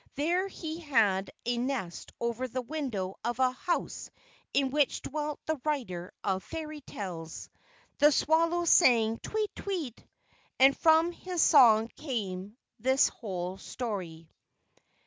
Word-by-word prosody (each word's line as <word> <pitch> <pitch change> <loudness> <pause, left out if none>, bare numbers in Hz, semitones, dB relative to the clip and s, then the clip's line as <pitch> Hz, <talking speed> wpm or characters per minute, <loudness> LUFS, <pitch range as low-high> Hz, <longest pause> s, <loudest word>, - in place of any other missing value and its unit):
There 345 +7 +1
he 325 -4 -6
had 215 - +2 0.2
a 240 0 0
nest 245 -9 -3
over 235 +2 -2
the 255 +1 -4
window 235 -10 -4
of 240 0 -2
a 260 -1 +3
house 345 +7 -3 0.4
in 275 -2 +1
which 290 -1 +1
dwelt 300 0 -3
the 315 -4 -2
writer 230 - -3
of 190 -1 0
Fairy 310 -2 -6
tales. 170 - -7 0.5
The 295 +1 +7
swallow 335 +4 +2
sang, 230 -9 +5
"Tweet! 430 -1 -3
Tweet!" 335 - -4 0.6
And 270 +1 +7
from 320 +1 +4
his 355 -1 -1
song 225 -7 +6
came 210 -7 -5 0.2
this 260 +2 +3
whole 185 -3 -5
story. 185 -10 -5
260 Hz, 125 wpm, -29 LUFS, 210-310 Hz, 0.6 s, The